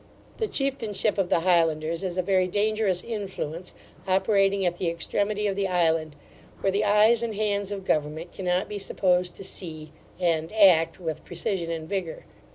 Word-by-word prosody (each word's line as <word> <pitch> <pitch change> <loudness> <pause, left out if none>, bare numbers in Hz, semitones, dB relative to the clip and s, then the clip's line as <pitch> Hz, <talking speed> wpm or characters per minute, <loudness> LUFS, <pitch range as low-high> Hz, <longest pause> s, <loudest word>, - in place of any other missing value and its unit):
The 440 - -1
chieftainship 230 - -1
of 185 -2 +1
the 165 - +3
Highlanders 165 -1 +2
is 185 -1 -3
a 185 - +1
very 185 0 +2
dangerous 205 -1 0
influence 190 -6 -5 0.3
operating 195 0 +2
at 175 0 0
the 175 - 0
extremity 205 +5 -1
of 200 -2 0
the 200 0 0
island, 165 -4 +1 0.5
where 195 - +2
the 200 +2 +1
eyes 215 +3 +4
and 230 -2 -3
hands 205 -1 -1
of 195 -2 -5
government 155 +2 -1
cannot 180 0 -1
be 210 - -5
supposed 180 -2 0
to - - -9
see 155 -5 -5 0.3
[and] 165 -3 0
act 185 -7 +5
with 160 -4 -4
precision 175 -4 -3
and 160 -1 -4
vigour. 185 -3 -4
185 Hz, 165 wpm, -26 LUFS, 170-205 Hz, 0.5 s, act